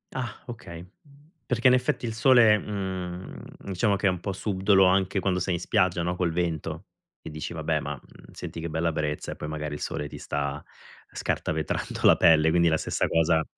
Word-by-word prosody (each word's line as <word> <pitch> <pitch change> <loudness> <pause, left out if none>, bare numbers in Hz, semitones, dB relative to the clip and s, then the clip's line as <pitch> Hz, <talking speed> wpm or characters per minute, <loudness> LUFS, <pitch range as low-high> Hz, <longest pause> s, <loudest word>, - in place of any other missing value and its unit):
Ah 125 -4 -5
okay. 90 -8 -9 0.6
Perché 125 +1 +2
in 125 - +6
effetti 125 -1 0
il 115 - -3
sole, 115 -2 +6
mhmm, 95 -3 -5 0.2
diciamo 100 +2 0
che 100 - -3
è - - +5
un 90 - -4
po' 100 - -3
subdolo 95 0 +2
anche 95 +1 +2
quando 90 -1 0
sei 90 0 -1
in - - -3
spiaggia, 90 -2 +1
no, 90 +1 -1
col 90 -2 0
vento 85 -2 -3 0.4
e - - -8
dici: 75 0 -6
"Vabbè - - -1
ma, - - -4
mhmm, - - -19
senti - - -7
che 85 - -4
bella 80 +2 0
brezza" 75 -1 -3
e - - -6
poi 75 - -6
magari 75 -1 -4
il 75 - -5
sole 75 - -3
ti - - -10
sta 70 0 -3 0.5
scartavetrando 80 0 -3
la - - +7
pelle, 80 -1 +5
quindi 85 0 +3
la 80 - +2
stessa - - -1
cosa, 80 0 +2
90 Hz, 200 wpm, -26 LUFS, 80-100 Hz, 0.6 s, la